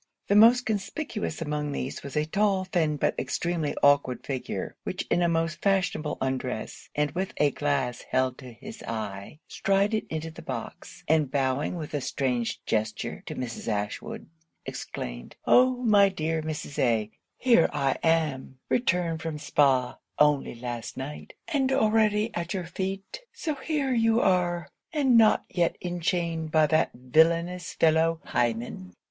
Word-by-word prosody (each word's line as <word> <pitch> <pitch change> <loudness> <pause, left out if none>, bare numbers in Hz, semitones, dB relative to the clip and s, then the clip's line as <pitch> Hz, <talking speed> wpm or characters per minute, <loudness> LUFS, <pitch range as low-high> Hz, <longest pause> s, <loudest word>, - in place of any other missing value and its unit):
The 200 - +4
most 235 +4 +7
conspicuous 210 - -3
among 150 -1 -2
these 130 -1 -4
was 140 +1 -6
a 150 - +2
tall, 195 +2 +1
thin, 160 -5 0
but - - +1
extremely 160 +3 -1
awkward 145 -3 +3
figure, 130 -3 -4
which - - -4
in 175 - +3
a 170 - +3
most 165 -1 -1
fashionable 185 -6 0
undress, 130 -3 -3
and 150 -1 +1
with 185 +5 -3
a 145 -1 +3
glass 135 -5 -1
held 130 -1 +1
to 130 -3 -10
his 215 - -10
eye, 110 +5 -5
strided 200 +3 +1
into 160 0 -3
the - - -11
box, 130 +7 -7
and 155 -3 +3
bowing 135 +3 0
with 155 -3 -6
a 145 - -1
strange 125 -3 -2
gesture 110 -1 -2
to - - -5
Mrs. 120 -3 -5
Ashwood, 105 -2 -3 0.4
exclaimed - - -6
'Oh! 250 0 +4
my 205 -4 +6
dear 160 -3 -2
Mrs. 155 -2 -5
A! 110 -3 +1 0.3
here 235 -9 +4
I 135 -2 0
am! 155 -5 0
returned 175 -8 +1
from 160 -2 -4
Spa 135 -4 +2 0.2
only 150 -4 +3
last 120 -1 -6
night; 140 +3 -7
and 275 -5 +1
already 220 -3 +3
at 175 +2 -3
your 185 -2 -3
feet. 195 - -5
So 315 - -3
here 280 -1 -1
you 225 -1 +3
are? 175 -5 +1 0.2
and 280 -6 +3
not 225 -2 +5
yet 175 -2 0
enchained 170 -2 -2
by 155 -1 +5
that 155 +1 +2
villainous 165 +7 +2
fellow 165 +1 +3
Hymen? 115 -6 -2
160 Hz, 150 wpm, -27 LUFS, 135-195 Hz, 0.4 s, most